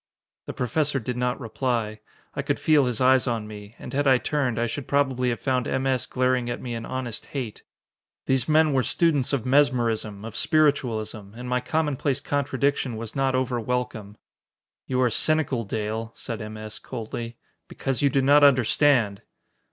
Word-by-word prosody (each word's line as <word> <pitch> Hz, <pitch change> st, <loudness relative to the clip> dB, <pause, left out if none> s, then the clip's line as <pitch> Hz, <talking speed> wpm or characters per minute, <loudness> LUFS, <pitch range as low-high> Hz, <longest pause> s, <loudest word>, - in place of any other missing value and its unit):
The -, -, -4 dB
Professor 140 Hz, +4 st, 0 dB
did 125 Hz, +1 st, -4 dB
not 125 Hz, 0 st, -1 dB
reply. 115 Hz, -3 st, -2 dB, 0.3 s
I -, -, -2 dB
could -, -, -1 dB
feel 150 Hz, -3 st, +4 dB
his 120 Hz, -3 st, -1 dB
eyes 130 Hz, 0 st, +4 dB
on 115 Hz, -3 st, -1 dB
me, 105 Hz, +1 st, -10 dB
and -, -, -9 dB
had 145 Hz, +1 st, +1 dB
I 130 Hz, -1 st, +6 dB
turned, 130 Hz, -3 st, -1 dB
I 120 Hz, -, +2 dB
should 125 Hz, +4 st, -5 dB
probably 130 Hz, -3 st, +1 dB
had 120 Hz, -, -2 dB
found 130 Hz, -3 st, 0 dB
M. 130 Hz, 0 st, -1 dB
S. 130 Hz, -3 st, +1 dB
glaring 125 Hz, -1 st, +1 dB
at 120 Hz, -, -3 dB
me 120 Hz, -2 st, -5 dB
in 115 Hz, 0 st, -5 dB
honest 130 Hz, -3 st, -4 dB
hate. 125 Hz, -7 st, -5 dB, 0.6 s
These 130 Hz, +1 st, +1 dB
men 155 Hz, -1 st, +4 dB
were 130 Hz, -, +3 dB
students 145 Hz, +1 st, +2 dB
of 135 Hz, -5 st, -1 dB
mesmerism, 120 Hz, -6 st, +1 dB
of 115 Hz, -1 st, -8 dB
spiritualism, 120 Hz, -9 st, 0 dB
and 125 Hz, +1 st, -7 dB
my 125 Hz, 0 st, +1 dB
commonplace 145 Hz, -1 st, 0 dB
contradiction 140 Hz, -3 st, -1 dB
was 115 Hz, 0 st, -7 dB
not 135 Hz, -1 st, +1 dB
over 130 Hz, -1 st, 0 dB
welcome. 115 Hz, -3 st, -3 dB, 0.7 s
"You 130 Hz, -1 st, 0 dB
are 125 Hz, -2 st, +3 dB
cynical, 140 Hz, -3 st, +1 dB
Dale," 110 Hz, +2 st, -3 dB
said 115 Hz, -3 st, -6 dB
M. 110 Hz, 0 st, -7 dB
S. 110 Hz, 0 st, -6 dB
coldly, 115 Hz, -1 st, -6 dB, 0.3 s
"because 135 Hz, 0 st, -3 dB
you 140 Hz, -, +4 dB
do 135 Hz, -1 st, +1 dB
not 145 Hz, +2 st, +6 dB
understand!" 125 Hz, -5 st, +4 dB
125 Hz, 175 wpm, -25 LUFS, 115-140 Hz, 0.7 s, I